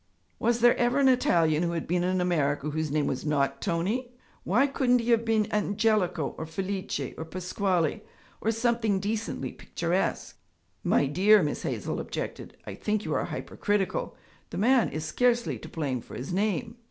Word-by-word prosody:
'Was 235 +1 +1
there 240 0 +6
ever 245 +2 +2
an 280 -1 +4
Italian 165 -11 +3
who 170 -1 0
had 165 - -2
been 175 +1 0
in 185 +1 +1
America 150 -4 0
whose 155 0 -2
name 150 0 +1
was 130 - -2
not 145 -2 0
Tony? 210 +8 -1 0.3
Why 235 +10 +3
couldn't 260 -3 +2
he 240 0 0
have 230 -1 +4
been 220 -2 +2
Angelico 210 -6 +1
or 160 - -4
Felice 190 +4 -3
or - - -3
Pasquale 180 0 -1 0.4
or 220 - 0
something 225 -3 +1
decently 215 +3 -3
picturesque?' - - -2 0.4
'My - - +3
dear,' 190 +8 +5
Miss 150 - -2
Hazel - - -3
objected, - - -6
'I - - -6
think 210 0 -2
you - - -1
are - - 0
hypercritical. 200 -3 -2 0.3
The - - -6
man 245 +4 +4
is 155 0 -4
scarcely 240 +8 +1
to 160 - -10
blame 140 -7 -2
for - - -11
his 135 +8 -5
name.' 215 +4 -1
195 Hz, 170 wpm, -28 LUFS, 160-225 Hz, 0.4 s, there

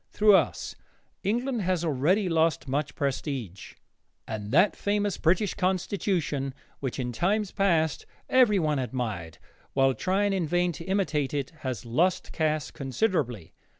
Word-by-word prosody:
Through 210 0 +5
us, - - 0 0.5
England 240 +3 -1
has 180 -2 0
already 165 +8 +2
lost 165 -3 +1
much 140 +2 -2
prestige, 135 - -4 0.5
and 105 -2 -5
that 180 +9 +4
famous 205 -1 -1
British 185 +4 +2
Constitution, 180 -7 -1 0.2
which 130 -3 -3
in 125 -2 -2
times 200 - 0
past 165 -7 +1 0.2
everyone 200 - +3
admired 110 -10 -4 0.4
while 135 -1 +3
trying 195 +6 +1
in 180 -4 0
vain 175 +2 +1
to 165 +1 -9
imitate 165 -8 0
it, 140 -2 -2
has 125 -6 -4
lost 170 +11 +1
caste 155 -2 -1
considerably. 135 - -1
160 Hz, 130 wpm, -27 LUFS, 135-195 Hz, 0.5 s, Through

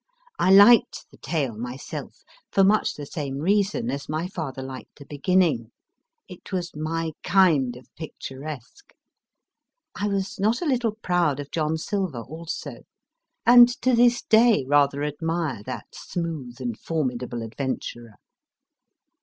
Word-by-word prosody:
1 190 +1 +6
liked 215 +2 +6
the - - -18
tale 140 -9 -2
myself, 125 +4 -7 0.3
for 195 - +4
much 205 +3 +3
the 145 - -7
same 140 -2 -5
reason 205 +8 +1
as 140 +1 -5
my 155 +3 -2
father 145 -8 -5
liked 130 -1 -9
the 140 - -12
beginning: 145 - +1 0.6
it - - -12
was 180 -4 -3
my 160 +1 -2
kind 165 -10 +3
of 125 - -13
picturesque. 150 - -9 1.0
I 205 - -2
was 195 -1 -2
not 215 +4 +2
a 350 - -3
little 245 -7 0
proud 175 -6 +1
of 145 0 -7
John 160 -1 0
Silver, 180 - -3
also; 160 +6 -7 0.7
and 240 0 +9
to 255 - +3
this 240 0 +4
day 220 - +4
rather 145 0 +3
admire 155 -3 -2
that - - -7
smooth 155 -8 -5
and 120 -4 -4
formidable 125 -6 -3
adventurer. 120 -1 -5
160 Hz, 135 wpm, -24 LUFS, 135-195 Hz, 1.0 s, and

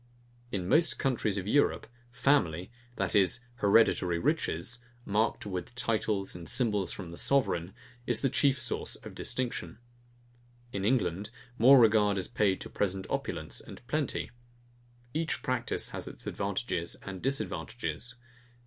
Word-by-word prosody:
In 90 -3 -2
most 160 - +3
countries 115 -6 +1
of 95 - -2
Europe, 145 +8 +2 0.3
family, 100 - +2 0.2
that 95 -5 0
is, 100 +4 +4 0.2
hereditary 100 -5 +4
riches, 85 +6 0 0.3
marked 110 +2 +1
with 95 +3 -5
titles 110 -4 0
and 85 -1 -8
symbols 105 -6 +1
from 90 -4 -6
the 85 - -8
sovereign, 100 -9 +1 0.3
is 120 -2 +1
the 135 - +3
chief 140 -2 +3
source 120 - -2
of - - -11
distinction. 125 -4 -2 1.0
In 100 - -2
England, 100 -4 +1 0.3
more 130 +4 +9
regard 105 -3 +5
is 95 - -1
paid 100 -3 +1
to - - -4
present 95 -1 -1
opulence - - -3
and 120 - -12
plenty. 150 +2 -1 0.8
Each 160 +1 -1
practice 125 -2 0
has - - -6
its - - -9
advantages 100 -3 -2
and 95 -2 -6
disadvantages. 125 -2 -2
105 Hz, 135 wpm, -30 LUFS, 95-125 Hz, 1.0 s, more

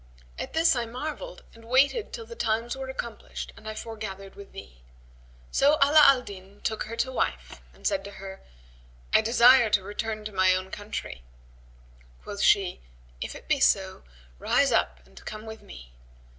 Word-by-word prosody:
At - - -5
this 325 -2 +4
I 240 -2 -2
marvelled 310 - -6
and 230 0 -16
waited 275 - +2
till 460 - -7
the 470 - -10
times 230 - -1
were 265 0 -6
accomplished 235 -4 -6
and 220 - -9
I 215 - -6
foregathered 200 -4 -7
with 200 -1 -12
thee." 60 -1 -12 0.7
So 285 +2 +4
Ala 290 +2 +7
al 265 -2 +6
Din 195 0 -11
took 220 - -2
her 230 - -6
to 260 +3 -1
wife - - -3
and - - -19
said 295 - +1
to 200 - -8
her, 195 0 -9 0.7
"I - - +7
desire 240 +1 +6
to 205 -2 +2
return 215 +2 -4
to 215 - -5
my 185 -1 +4
own 185 +1 -4
country." 205 - -6 1.0
Quoth 200 - -6
she, 190 -3 +3 0.4
"If - - -4
it - - -12
be - - +2
so, - - +2 0.4
rise - - +2
up 60 0 0
and 65 -1 -16
come 215 +1 -7
with 220 0 -9
me." - - -13
220 Hz, 175 wpm, -27 LUFS, 195-255 Hz, 1.0 s, Ala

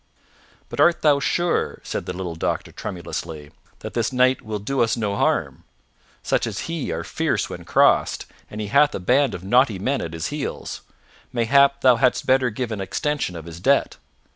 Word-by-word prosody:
"But - - -8
art 170 0 +4
thou 145 -2 +5
sure," 175 +4 0
said - - -4
the 90 - -3
little 90 -2 -5
doctor 80 - -3
tremulously, 80 -4 -6 0.3
"that - - -7
this 115 0 0
knight 130 0 +3
will 110 -1 -4
do 130 +7 -2
us 115 +1 +2
no 105 -3 -1
harm? - - 0 0.6
Such - - 0
as - - -4
he 165 -4 -4
are 85 +1 -3
fierce - - -1
when - - -8
crossed, - - +3 0.2
and 105 - -8
he 105 - -2
hath 145 +5 +4
a - - -3
band 130 +9 +2
of 90 - -8
naughty 120 +1 +3
men 130 +9 -1
at 80 - -5
his 80 -1 -3
heels. 150 -2 -5 0.5
Mayhap 140 +4 +3
thou 125 -2 +5
hadst 130 0 +2
better 130 -1 +3
give 120 +1 -4
an 105 -3 -3
extension 150 - -2
of 80 -1 -8
his 85 0 -9
debt." - - +2
120 Hz, 190 wpm, -22 LUFS, 95-140 Hz, 0.6 s, thou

